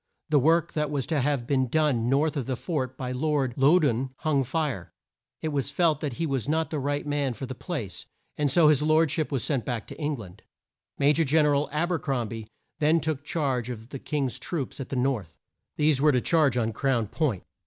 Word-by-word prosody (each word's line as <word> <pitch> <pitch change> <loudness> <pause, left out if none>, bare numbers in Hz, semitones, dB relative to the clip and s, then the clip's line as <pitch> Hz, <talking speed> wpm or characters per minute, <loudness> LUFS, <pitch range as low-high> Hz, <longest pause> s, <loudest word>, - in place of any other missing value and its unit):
The 150 -1 +4
work 160 +4 +3
that 150 -1 0
was 145 -3 -1
to 155 -4 0
have 140 -3 0
been 130 0 +1
done 130 -4 +1
north 145 +4 +2
of 135 -5 -3
the 130 - -1
fort, 130 -4 -3
by 125 -1 -4
Lord 135 -1 0
Lou 145 +7 +5
doun, 130 -4 +1
hung 145 -4 +2
fire. 130 - -2 0.5
It 160 - -1
was 140 -3 -1
felt 165 -5 +2
that 145 -4 -3
he 165 - -2
was 135 -3 -2
not 160 -1 0
the 155 - -1
right 145 +2 -1
man 145 -4 -1
for 135 - -5
the 130 - -6
place, 125 - -5 0.3
and 145 -1 +1
so 155 +3 +5
his 150 -2 +4
lord 155 0 +3
ship 155 0 -1
was 135 -4 0
sent 135 -6 0
back 120 -4 -3
to - - -9
Eng 150 0 0
land. 100 -8 -11 0.6
Ma 140 +1 +4
jor 165 +2 +2
Gen 155 +1 +3
er 145 - +3
al 140 0 +1
Ab 165 +4 0
er 170 - +1
crom 125 -7 -2
bie 110 -1 -7 0.3
then 155 +2 +4
took 155 -3 -2
charge 135 -6 -1
of 115 -1 -7
the 135 - -6
King's 140 -4 -2
troops 150 -6 -4
at 135 - -6
the - - -3
north. 125 - -1 0.4
These 150 -3 +3
were 150 0 +5
to 130 - +2
charge 150 -2 +2
on 115 -2 0
Crown 130 -4 +1
Point. 120 - -1
140 Hz, 230 wpm, -27 LUFS, 125-155 Hz, 0.6 s, Lou